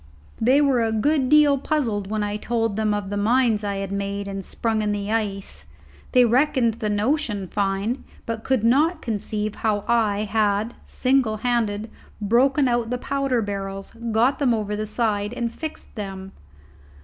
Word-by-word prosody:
They 260 +6 +5
were 265 -5 +3
a 225 - 0
good 265 +4 +1
deal 295 -2 +5
puzzled 230 -10 -1
when 215 0 -1
I 205 0 -2
told 225 -1 -1
them 215 0 +1
of 205 -1 -2
the 205 - -2
mines 225 0 +2
I 200 -1 -2
had 195 0 -4
made 200 0 -3
and 195 -1 -5
sprung 220 +3 -1
in 210 -1 0
the 205 0 -3
ice. 195 - -3 0.5
They 250 -1 +6
reckoned 245 -2 +2
the 215 - -1
notion 210 -2 0
fine, 200 +6 -1 0.2
but 225 -1 -4
could 260 -5 +1
not 305 +8 +3
conceive 215 -1 -2
how 210 -2 -1
I 215 -3 +2
had, 215 +1 0
single 255 -4 +1
handed, 220 -3 0 0.3
broken 260 +6 +3
out 240 -2 0
the 250 - -1
powder 270 -2 -1
barrels, 195 -1 -5 0.2
got 235 +5 +2
them 255 -5 +3
over 210 -1 -2
the 215 +1 -3
side, 210 -1 0
and 235 -2 -3
fixed 315 -1 -7
them. 195 -3 -6
220 Hz, 170 wpm, -23 LUFS, 205-250 Hz, 0.5 s, They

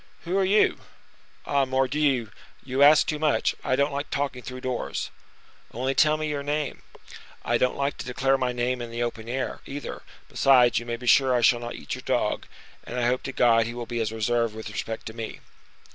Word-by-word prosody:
"Who 175 +2 -2
are - - +3
you?" 200 +3 +3 0.7
"Ah! 140 -1 +2
Mordioux! 130 -2 +1 0.3
you 130 +1 -2
ask 145 +1 +7
too 150 - -2
much; 155 -1 +2
I 130 - +1
don't 140 +1 +1
like 145 +1 -3
talking 140 -3 -2
through 130 0 -8
doors." 125 -2 -3 0.6
"Only 130 +3 -1
tell 155 +3 +4
me 155 0 -2
your 145 -1 -2
name." 145 0 -2 0.6
"I 120 0 +1
don't 125 - +1
like 140 +1 -2
to - - -5
declare 135 +2 +1
my 130 -2 0
name 125 +1 -1
in 120 - -5
the 120 +1 -2
open 115 -1 -5
air, 130 +1 -3
either; 140 +1 -6 0.3
besides, 125 -4 +4
you 120 - -10
may 120 - -2
be 125 - -10
sure 130 +1 +5
I 120 - +2
shall 120 +1 +4
not 120 0 -6
eat - - -6
your - - -5
dog, - - -1 0.4
and 125 - -5
I 120 - +1
hope 125 +1 +1
to 135 - -5
God 115 -3 +3
he 120 - -6
will 120 -1 -5
be 120 0 -4
as 110 -1 -1
reserved 115 0 0
with 110 - -7
respect 110 0 -5
to 110 - -6
me." 115 -1 -6
130 Hz, 215 wpm, -26 LUFS, 120-140 Hz, 0.7 s, ask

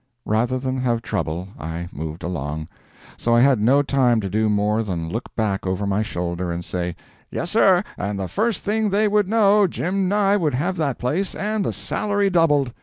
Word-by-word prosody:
Rather 115 +4 +1
than 130 0 -2
have 120 -2 0
trouble, 85 +2 -3
I 80 +3 -5
moved 80 +3 -6
along. 80 -2 -4 0.5
So 120 0 +1
I 120 - +5
had 130 -4 +4
no 135 +6 +4
time 130 -4 +2
to 95 -2 -4
do 110 +1 +1
more 105 +1 +1
than 85 -6 -3
look 115 +7 -4
back 100 -4 -1
over 95 +2 -1
my 100 +1 +1
shoulder 90 -4 -3
and 85 0 -4
say: 90 -1 -3 0.3
"Yes, 170 - -3
sir, 190 -4 +4 0.2
and 100 0 -2
the 95 - -2
first 220 - -1
thing 215 +1 +1
they 210 +2 +2
would 205 -2 +2
know, 210 -2 +4
Jim 185 +2 -1
Nye 205 0 +3
would 155 -9 0
have 175 +8 -1
that 145 -5 -1
place, 165 +10 -1
and 210 0 -1
the - - -1
salary 205 -2 0
doubled! 145 -7 +3
125 Hz, 195 wpm, -22 LUFS, -, 0.5 s, I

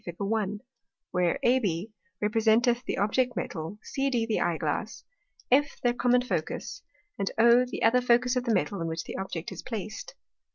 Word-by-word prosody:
Fig. 175 -1 -7
1._ 205 0 -1 0.5
where 180 -2 +1
AB 215 -6 +1 0.3
representeth 225 +3 +3
the - - -2
Object 240 +5 +1
Metal, 165 +2 -4
CD 270 -4 0
the 225 -2 0
Eye 170 -2 +1
glass, - - -3 0.5
F 285 +2 +3
their 245 -1 +2
common 245 0 +2
Focus, 175 -10 -3 0.4
and 195 - 0
O 235 +2 +6
the - - -4
other 250 +3 +5
Focus 245 +1 +3
of 250 0 -1
the 235 - +2
Metal, 185 +2 -1
in 165 - -2
which 160 0 -3
the - - -7
Object 180 -4 -5
is - - -7
placed. 220 - -6
225 Hz, 170 wpm, -28 LUFS, 190-245 Hz, 0.5 s, O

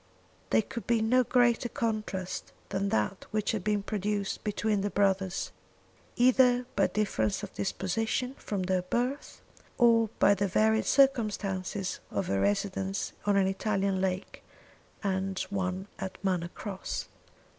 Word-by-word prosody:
There 220 - +4
could 235 +2 -7
be 235 -1 +3
no 245 +4 +4
greater 240 -1 +3
contrast 215 -6 -3 0.2
than 200 0 -1
that 110 - -1
which 215 -1 0
had 215 -5 -2
been 210 -1 +1
produced 205 -1 -2
between 210 -1 0
the 205 - 0
brothers, 195 -2 0 0.6
either 250 0 +4
by - - +4
difference 110 - 0
of - - -7
disposition 225 - -1
from 200 -3 -3
their 185 0 +1
birth, 245 +10 -2 0.4
or 230 -2 +5
by 200 - +6
the 200 0 0
varied 220 +3 +2
circumstances 205 -8 +1
of 100 -1 -2
a 100 - +1
residence 190 - -1
on 205 -1 +3
an 195 - +4
Italian 195 0 0
lake 185 0 -2 0.6
and 190 -1 -1
one 190 0 -2
at 190 -1 -5
Manor 180 -3 0
Cross. 195 +1 -5
200 Hz, 135 wpm, -29 LUFS, 190-220 Hz, 0.6 s, by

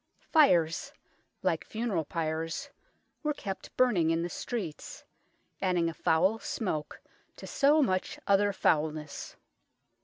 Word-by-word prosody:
Fires, 175 - +4 0.5
like - - +1
funeral 215 -8 -2
pyres, 165 - -3 0.5
were 300 -2 -1
kept 195 -6 -7
burning 205 -11 +3
in 165 +1 +1
the 175 - -3
streets, 185 -7 -5 0.6
adding 180 -3 +2
a - - -5
foul 180 +7 +2
smoke 155 -12 -3 0.4
to - - -10
so 295 +2 +4
much 185 -6 -1
other 200 +1 +4
foulness. 155 -4 -1
180 Hz, 115 wpm, -30 LUFS, 160-225 Hz, 0.6 s, Fires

